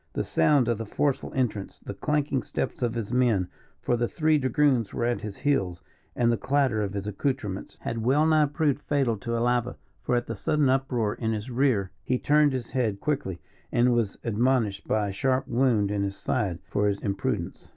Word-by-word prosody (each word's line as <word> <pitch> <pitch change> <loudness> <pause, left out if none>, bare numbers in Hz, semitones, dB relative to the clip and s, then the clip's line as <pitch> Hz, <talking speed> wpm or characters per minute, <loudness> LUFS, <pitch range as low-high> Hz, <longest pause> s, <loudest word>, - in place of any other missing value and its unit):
The - - -1
sound 145 -6 +3
of 115 -2 0
the 115 - -3
forceful 140 +5 -1
entrance, 115 -7 -2
the - - -8
clanking 145 +3 0
steps - - -4
of 120 -1 0
his 115 0 -3
men, 115 -8 +2 0.3
for 120 - +2
the 120 0 0
three 155 +1 +2
dragoons 130 -4 +2
were 120 - 0
at 120 0 0
his 105 -2 -6
heels, 95 -12 0 0.3
and 120 -1 +3
the 115 - +1
clatter 135 -5 +1
of 100 -1 -2
his 100 0 -3
accoutrements, 105 -2 -3
had 115 - -3
well 135 +7 +3
nigh 155 -2 +4
proved 145 -2 0
fatal 140 -6 0
to 115 +3 -3
Alava; 120 +1 0 0.2
for 125 - 0
at 120 - 0
the 115 - -4
sudden 150 +5 +1
uproar 130 -5 +1
in 110 -1 -2
his 110 +4 -4
rear, 120 -7 +1
he 125 - 0
turned 150 +2 +3
his 125 -3 -4
head 110 -6 0
quickly, 130 - -2 0.3
and 120 +1 +3
was 115 -5 0
admonished 115 -2 +1
by 105 -2 +1
a - - -5
sharp 130 +5 0
wound 115 -5 +2
in 100 -1 0
his 100 0 -2
side 95 -4 -1
for 105 0 +1
his 100 -1 0
imprudence. 100 -1 -3
120 Hz, 200 wpm, -26 LUFS, 105-135 Hz, 0.3 s, nigh